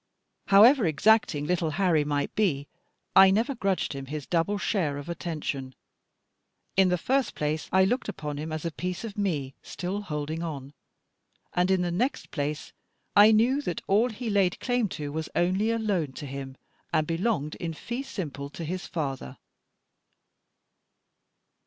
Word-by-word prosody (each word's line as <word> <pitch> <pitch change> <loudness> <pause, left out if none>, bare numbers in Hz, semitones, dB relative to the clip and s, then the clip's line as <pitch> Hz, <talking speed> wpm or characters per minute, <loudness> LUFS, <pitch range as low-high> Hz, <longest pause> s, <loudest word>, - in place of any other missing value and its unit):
However 220 +2 +7
exacting 160 -1 +3
little 170 0 0
Harry 175 -6 +3
might 145 -1 -1
be, 150 -10 0 0.5
I 190 0 +9
never 225 +8 +2
grudged 195 - -1
him 135 -1 -7
his 150 0 -5
double 170 +9 0
share 170 -9 0
of 145 +3 -7
attention. 150 -6 -4 1.0
In 190 -1 +5
the 180 - +2
first 265 +9 0
place 150 +1 -2
I 190 +1 +5
looked 245 +6 -1
upon 150 -1 -5
him 155 +2 -5
as 155 +1 -4
a 165 - -1
piece 180 +5 -4
of 220 -3 -6
me, 155 -11 -1
still 190 +3 -4
holding 155 -3 -4
on; 145 -4 -5 0.8
and, 180 +1 +2
in 190 -1 +3
the 175 - -1
next 245 +11 -1
place, 145 +1 -3 0.4
I 210 +2 +8
knew 240 +6 +3
that 175 - -4
all 215 +6 +3
he 230 0 -4
laid 195 -3 +2
claim 245 -4 0
to 145 -3 -5
was 160 +1 -4
only 185 +5 +2
a 230 - +1
loan 190 -11 -1
to 145 - -7
him, 135 -1 -7 0.3
and 155 -2 +2
belonged 165 -2 -1
in 165 -2 -4
fee 240 +10 -4
simple 145 - -5
to 165 - -7
his 180 +4 -4
father. 135 - -4
175 Hz, 160 wpm, -27 LUFS, 150-205 Hz, 1.0 s, I